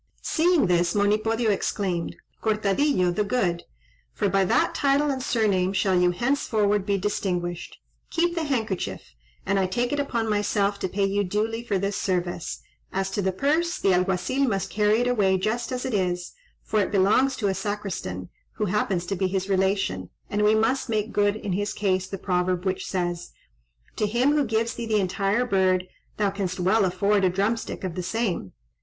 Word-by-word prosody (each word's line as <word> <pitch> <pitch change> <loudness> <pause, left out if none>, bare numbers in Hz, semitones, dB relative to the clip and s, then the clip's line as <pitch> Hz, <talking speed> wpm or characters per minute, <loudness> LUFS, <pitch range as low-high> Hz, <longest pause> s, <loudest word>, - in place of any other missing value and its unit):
Seeing 340 - +3
this, 175 0 +2
Monipodio 215 +2 +2
exclaimed 190 -3 -2 0.3
"Cortadillo 210 -1 +2
the 210 +4 0
Good! 195 -6 -1 0.5
for 205 - 0
by 195 +1 +3
that - - +2
title 280 +1 +2
and 265 -1 -3
surname 200 -6 +1
shall 195 -1 +1
you 180 0 +4
henceforward 210 -2 +1
be 200 -1 +2
distinguished. 180 -3 -3 0.3
Keep 345 +1 +1
the 330 -2 -2
handkerchief, 225 - -3 0.3
and 195 0 +1
I 190 - +1
take 240 +7 -1
it 290 - 0
upon 235 -5 -1
myself 205 -1 0
to 190 - -2
pay 200 +2 0
you 200 +1 +1
duly 220 +4 -1
for 210 -5 0
this 200 +1 -1
service; 175 -2 -2 0.3
as 195 0 -2
to 205 - -1
the 190 0 +1
purse, 310 - 0
the 195 - +2
Alguazil 190 +9 +1
must 195 -5 -1
carry 210 +2 +2
it 245 - +1
away 200 -6 +2
just 225 +6 -2
as 250 -1 -3
it 260 - -2
is, 180 -3 -1 0.3
for 215 - 0
it 200 - +1
belongs 210 +7 +3
to 205 - -1
a 195 - +1
Sacristan 190 - -4 0.2
who 210 - -2
happens 190 -3 0
to 195 - -2
be 190 0 0
his 190 +1 -2
relation, 190 - 0 0.2
and 205 - 0
we 210 +1 +5
must 230 +4 +1
make 215 0 -1
good 205 0 +2
in 205 -3 -4
his 205 +3 -1
case 190 -2 0
the 195 - -5
proverb, 180 0 -1
which 190 0 -2
says, 175 -2 -3 0.6
'To 210 - +1
him 240 +6 +2
who 295 -1 +2
gives 225 0 0
thee 235 -1 -5
the 215 -1 +2
entire 195 +5 0
bird, 185 -4 +2 0.3
thou 205 -2 +1
canst 190 -2 -3
well 190 +4 +3
afford 200 +2 +1
a 185 - +4
drumstick 200 +6 -2
of 185 -3 -3
the 180 - -3
same.' 185 - -2
200 Hz, 185 wpm, -25 LUFS, 185-225 Hz, 0.6 s, we